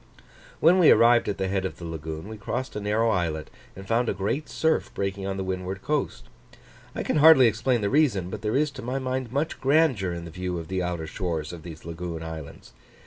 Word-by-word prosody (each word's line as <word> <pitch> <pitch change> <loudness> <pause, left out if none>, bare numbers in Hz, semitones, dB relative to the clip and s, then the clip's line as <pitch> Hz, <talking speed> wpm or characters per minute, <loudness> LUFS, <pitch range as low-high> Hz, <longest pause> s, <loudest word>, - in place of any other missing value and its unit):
When 175 +4 +5
we 170 - +7
arrived 120 -1 +5
at 100 - -2
the 95 - -1
head 95 0 -1
of 95 - -4
the 85 - -8
lagoon, 80 +1 -6
we 110 - -7
crossed 120 +5 -4
a - - -2
narrow 110 +2 +1
islet, 80 -5 -2 0.2
and 95 +1 -10
found 115 +2 +1
a - - -1
great 115 +10 -2
surf 160 0 0
breaking 95 0 -3
on 95 0 -3
the 95 - -2
windward 95 +1 -4
coast. 150 +2 -2 0.7
I - - -2
can - - 0
hardly 150 -3 +8
explain 115 +2 +1
the 100 - 0
reason, 120 - +2
but 105 - -6
there 105 +1 -1
is 150 +1 +2
to 130 -1 -9
my 125 +2 -3
mind 130 -2 -3
much 145 +4 -2
grandeur 135 - +3
in 85 0 -6
the 85 - -9
view 90 +1 -4
of 80 -1 -7
the 95 -1 -1
outer 90 -2 -3
shores 80 -2 -4
of 85 - -8
these 80 -1 -10
lagoon 85 0 -5
islands. 80 -3 -9
100 Hz, 225 wpm, -26 LUFS, 90-130 Hz, 0.7 s, hardly